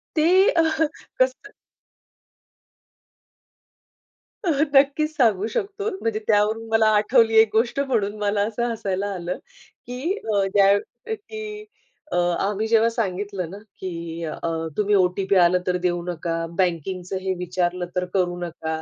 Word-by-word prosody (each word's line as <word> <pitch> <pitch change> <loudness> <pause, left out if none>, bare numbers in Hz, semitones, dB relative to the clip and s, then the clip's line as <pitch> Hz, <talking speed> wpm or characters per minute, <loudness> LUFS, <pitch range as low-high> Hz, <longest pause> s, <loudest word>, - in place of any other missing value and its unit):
ते 310 -1 +3 0.3
अह 320 -1 +3 0.4
कसं 260 +11 0 3.0
नक्कीच 290 0 +2
सांगू 220 -6 +2
शकतो. 405 - -3
म्हणजे 225 -1 -1
त्यावरून 215 +2 +2
मला 225 -1 +4
आठवली 225 +1 +3
एक 220 -1 +6
गोष्ट 230 +4 +1
म्हणून 225 -7 0
मला 205 0 +1
असं 235 +2 -2
हसायला 200 -3 -2
आलं 180 -1 -4 0.5
की 255 +9 -2 0.2
अ, 200 -1 +3
ज्या 200 0 +5 0.4
की 425 0 -8 0.5
अ, - - -1 0.2
आम्ही 210 +2 -1
जेव्हा 225 0 +4
सांगितलं 200 -5 -3
ना, 195 - -8 0.2
की 170 -2 -5
अ, 155 - -5 0.4
तुम्ही 210 0 +2
ओ-टी-पी 190 +1 +2
आलं 180 0 +5
तर 180 0 +2
देऊ 175 -1 0
नका, 165 -1 -3
बँकिंगचं 180 +1 -1
हे 190 0 -1
विचारलं 180 0 -1
तर 180 0 0
करू 175 -2 +1
नका. 160 -2 -4
205 Hz, 130 wpm, -23 LUFS, 180-240 Hz, 3.0 s, एक